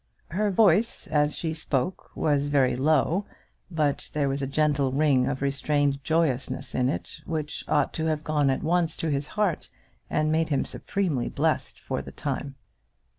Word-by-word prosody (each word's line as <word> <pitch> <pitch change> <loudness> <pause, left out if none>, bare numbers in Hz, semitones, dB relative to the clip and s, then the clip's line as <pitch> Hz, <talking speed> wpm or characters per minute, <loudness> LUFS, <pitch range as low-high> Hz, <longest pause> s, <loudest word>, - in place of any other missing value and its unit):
Her 205 +5 +1
voice 205 +2 +3
as 150 -1 +1
she 160 -2 -2
spoke 155 +1 -2
was 145 -2 +1
very 135 -4 +3
low, 155 +7 +2 0.4
but 150 -5 -1
there 145 -2 +1
was 135 +1 -2
a 135 - -1
gentle 145 -1 +1
ring 135 -2 +3
of 135 0 -2
restrained 140 0 +1
joyousness 135 -5 0
in 125 0 +1
it - - -4
which 155 -3 -3
ought 150 - +2
to 160 0 -1
have 155 -1 -1
gone 150 -2 +2
at 135 - 0
once 165 0 +1
to 160 - -1
his 140 +1 0
heart 205 -6 0 0.4
and 155 0 +1
made 160 0 +1
him 140 -3 +1
supremely 175 -11 -2
blessed - - -1
for - - -3
the - - -10
time. 140 -1 -4
150 Hz, 170 wpm, -26 LUFS, 140-160 Hz, 0.4 s, voice